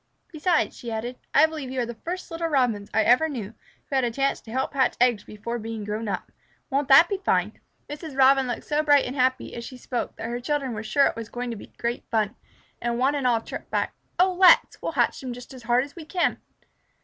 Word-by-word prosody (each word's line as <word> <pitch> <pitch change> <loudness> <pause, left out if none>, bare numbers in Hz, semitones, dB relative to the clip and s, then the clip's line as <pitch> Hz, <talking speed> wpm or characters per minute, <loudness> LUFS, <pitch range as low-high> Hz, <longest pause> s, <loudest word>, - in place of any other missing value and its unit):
Besides," 335 +1 +1
she 235 -2 -7
added, 240 +3 -4
"I 295 - +6
believe 310 -4 -5
you 260 0 -3
are 245 - +1
the 235 - -6
first 355 +10 -6
little 330 0 -2
Robins 245 -9 +1
I 220 - +3
ever 250 +8 +4
knew 230 -7 -5 0.3
who 275 - -4
had 265 - +3
a 240 - +1
chance 275 +4 0
to 220 - -12
help 260 +4 -1
hatch 265 -2 +2
eggs 240 -3 +3
before 235 +3 -5
being 225 -1 -5
grown 210 +2 -3
up. 195 -3 -4 0.4
Won't 275 +1 +1
that 275 +5 +8
be 395 +1 -2
fine?" 390 - 0 0.3
Mrs. 295 -1 -7
Robin 270 0 +5
looked 245 - -3
so 300 0 0
bright 290 -2 +4
and 250 - -5
happy 255 -1 +1
as 235 - -6
she 255 - -9
spoke 250 0 -4
that 225 - -6
her 240 +1 -4
children 275 -1 -1
were 210 - -4
sure 275 +6 +3
it - - 0
was 230 -1 -7
going 245 0 -4
to - - -4
be 200 - -10
great 235 +1 -2
fun, 215 0 0 0.5
and 235 0 -1
one 265 +3 +2
and 280 -3 0
all 235 -2 +2
chirped - - -8
back, - - -1 0.2
"Oh, 370 +1 +4
let's! 365 0 +5
We'll - - -3
hatch - - +1
them 255 -2 -5
just 245 +2 -11
as 255 - -10
hard 240 +2 +2
as 285 - -11
we 330 -3 -9
can." 350 +2 0
255 Hz, 245 wpm, -25 LUFS, 235-290 Hz, 0.5 s, that